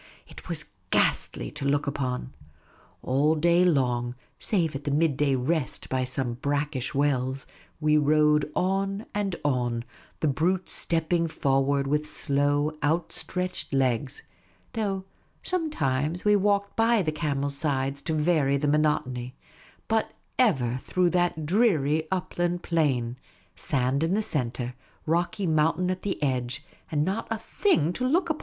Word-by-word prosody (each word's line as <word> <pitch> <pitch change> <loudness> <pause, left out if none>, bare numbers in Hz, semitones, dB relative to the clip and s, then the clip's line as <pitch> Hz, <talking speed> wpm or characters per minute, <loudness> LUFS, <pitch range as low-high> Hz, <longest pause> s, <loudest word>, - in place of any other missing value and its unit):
It - - -12
was 155 -3 -2 0.2
ghastly - - +1
to - - -6
look 145 +1 +1
upon. 130 -2 -3 0.7
All 145 +5 +2
day 170 +3 +4
long, 125 -7 +1 0.2
save 170 -8 0
at 140 - -5
the 145 - -2
midday 145 -2 +2
rest 135 +3 -1
by 130 -1 0
some 125 -1 -2
brack 145 +1 -1
ish 130 +2 -3
wells, 135 -2 0 0.3
we 150 0 +4
rode 150 0 +3
on 195 +3 0
and 200 -3 -1
on, 120 -4 0 0.3
the 155 - +1
brutes 175 +7 +1
stepping 165 0 +1
forward 140 -2 +1
with 150 +2 0
slow, 145 +2 +1
outstretched 175 +2 -1
legs; 130 +1 0 0.5
though 200 -4 -1 0.4
sometimes 170 - -1
we 210 0 +5
walked 200 0 +1
by 225 -2 +3
the 155 - 0
camels' 145 -3 -1
sides 140 -2 -1
to 160 - -2
var}' 150 -3 +2
the 145 +1 -1
monotony; 135 -4 0 0.5
but 220 0 0 0.3
ever 130 - +2
through 180 -1 +1
that 175 -3 +1
dreary 160 - +2
upland 175 -1 -1
plain, 130 -8 0 0.4
sand 135 0 0
in 165 +4 +1
the 215 - +1
centre, 125 - -2 0.3
rocky 170 +4 0
mountain 160 +3 +2
at 185 - -4
the 200 - -2
edge, 130 +1 -1 0.3
and 150 -1 +1
not 195 +5 -2
a 225 - -1
thing 210 - +1
to 250 - -4
look 340 +4 +2
at. 310 - -2
150 Hz, 140 wpm, -27 LUFS, 135-180 Hz, 0.7 s, we